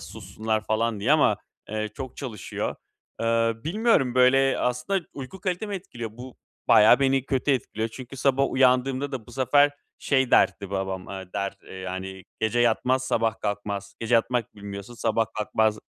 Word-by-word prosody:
sussunlar 110 0 -4
falan 110 -1 0
diye 125 +9 +3
ama, 155 - +4 0.3
eee, 110 0 -2
çok 130 -2 -7
çalışıyor. 120 -8 -4 0.4
Eee, 115 0 +2
bilmiyorum, 170 - +2
böyle, 135 +1 +4
aslında 125 +9 -1
uyku 145 +7 -8
kalitemi 195 +3 -2
etkiliyor. 120 - -6
Bu 125 +2 -11 0.3
bayağı 105 +5 +7
beni 135 -1 +2
kötü 135 +1 0
etkiliyor 115 -3 -1
çünkü 130 +3 -10
sabah 135 +1 +2
uyandığımda 130 +1 +2
da 125 -5 -5
bu 120 - -13
sefer 140 +3 +4 0.3
şey 130 -3 +1
derdi 100 -1 +3
babam, 95 -1 -3
eee, 95 -2 -8
der, 100 0 -2
eee, - - -11
yani, 95 0 -6 0.2
"Gece 110 +2 +1
yatmaz, 125 +3 +2
sabah 115 -3 0
kalkmaz. 100 -1 -4
Gece 115 +1 +1
yatmak 120 0 +1
bilmiyorsun, 100 +2 -8
sabah 115 -1 0
kalkmak 110 0 +1
120 Hz, 155 wpm, -25 LUFS, 105-135 Hz, 0.4 s, bayağı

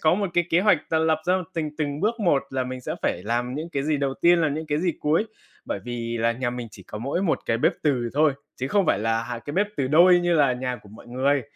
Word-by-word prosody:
có 155 +2 +4
một 200 0 -1
cái 175 - +3
kế 170 - +4
hoạch 200 -4 +4
là 160 - +3
lập 160 -1 +2
ra 180 - +3 0.2
tình 155 -2 -3
từng 145 -1 -2
bước 225 +4 0
một 170 -9 +3
là 130 -1 -1
mình 130 0 -6
sẽ - - -4
phải 90 - -1
làm 120 +4 -1
những 155 +4 -4
cái 140 -4 -2
gì 155 0 +1
đầu 140 -1 -1
tiên, 175 0 +4
làm 150 -3 +1
những 160 +1 -4
cái 150 0 0
gì 175 -1 +1
cuối. 155 +7 +2 0.4
Bởi - - -3
vì 120 -1 -4
là 115 +1 +2
nhà 120 +1 -2
mình 120 -1 -6
chỉ 100 - -13
có 105 - -8
mỗi 140 - -2
một 180 - +1
cái 115 - +1
bếp - - +3
từ 125 -6 +1
thôi, 150 0 +4 0.2
chứ 130 - -3
không 200 +1 +2
phải 100 - +3
là 115 +1 0
2 115 0 -5
cái 145 - -7
bếp 205 +2 +2
từ 135 - 0
đôi 175 +4 +6
như 175 0 +1
là 145 -5 +4
nhà 125 0 -3
của 105 - -16
mọi 110 +3 -14
người, 130 +3 +1
145 Hz, 285 wpm, -24 LUFS, 120-165 Hz, 0.4 s, đôi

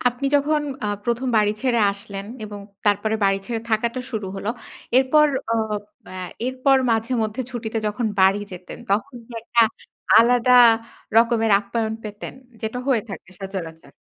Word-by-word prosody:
আপনি 245 +3 -4
যখন 295 +1 +1 0.2
আ - - -1 0.2
১ম 240 +2 -1
বাড়ি 210 -1 +3
ছেড়ে 240 -3 +2
আসলেন 200 -1 -8 0.2
এবং 205 -1 -8 0.3
তারপরে 205 +2 +2
বাড়ি 195 0 +3
ছেড়ে 230 -2 -3
থাকাটা 235 +3 0
শুরু 215 -4 -3
হল। 195 - -6 0.5
এরপর 300 +3 +5 0.3
অ - - +1 0.5
অ্যা 185 - -8 0.3
এরপর 260 +1 +3
মাঝে 225 +3 0
মধ্যে 220 +4 -3
ছুটিতে 225 -2 -3
যখন 210 +2 -1
বাড়ি 195 +2 +4
যেতেন 180 0 -9
তখন 250 +7 0
কি 245 - -14
একটা 235 0 +3 0.6
আলাদা 245 +1 +4 0.6
রকমের 230 -1 +4
আপ্যায়ন 220 +1 -2
পেতেন? 205 -1 -7 0.3
যেটা 220 +3 -3
হয়ে 250 -6 +2
থাকে 195 -3 -9
সচরাচর। 170 -7 -7
225 Hz, 150 wpm, -22 LUFS, 205-245 Hz, 0.6 s, এরপর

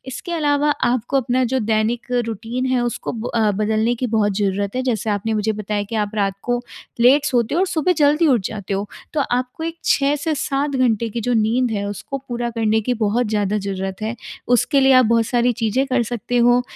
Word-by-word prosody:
इसके 355 - -7
अलावा 295 -2 +1
आपको 245 +2 +1
अपना 255 0 +1
जो 260 +2 0
दैनिक 220 +1 0 0.2
रूटीन 230 +3 -4
है 255 -1 +1
उसको 240 -2 -3
ब 230 0 -5
अ, 220 -2 +3
बदलने 215 +3 +1
की 250 +2 -2
बहुत 215 -3 +1
ज़रूरत 200 +1 -1
है 255 - 0
जैसे 225 -4 -1
आपने 210 +2 -1
मुझे 215 0 0
बताया 210 0 -3
कि 230 - -4
आप 210 -1 -1
रात 200 -2 +1
को 245 0 0 0.4
लेट 275 +5 +5
सोते 245 -2 +1
हो - - +2
और 380 - +3
सुबह 355 0 +1
जल्दी 300 +2 +4
उठ 250 -7 +3
जाते 205 -2 -5
हो। 200 +1 -2 0.3
तो 310 - 0
आपको 250 +5 -2
एक 330 +1 -4
6 280 0 +3
से 310 +2 -2
7 280 0 -1
घंटे 235 -3 +1
की 230 +2 -4
जो 245 +3 0
नींद 230 +2 +1
है 200 -2 -2
उसको 205 +7 -5
पूरा 240 -1 -2
करने 220 -1 +1
की 250 +4 0
बहुत 230 +1 0
ज़्यादा 210 -1 0
ज़रूरत 195 -1 -4
है। 220 +2 -3 0.3
उसके 245 +3 +3
लिए 270 0 +5
आप 255 -1 +6
बहुत 230 0 +2
सारी 245 0 +2
चीज़ें 225 +4 0
कर 255 -2 +1
सकते 240 +1 -3
हो 245 +1 +4
235 Hz, 220 wpm, -20 LUFS, 215-255 Hz, 0.4 s, आप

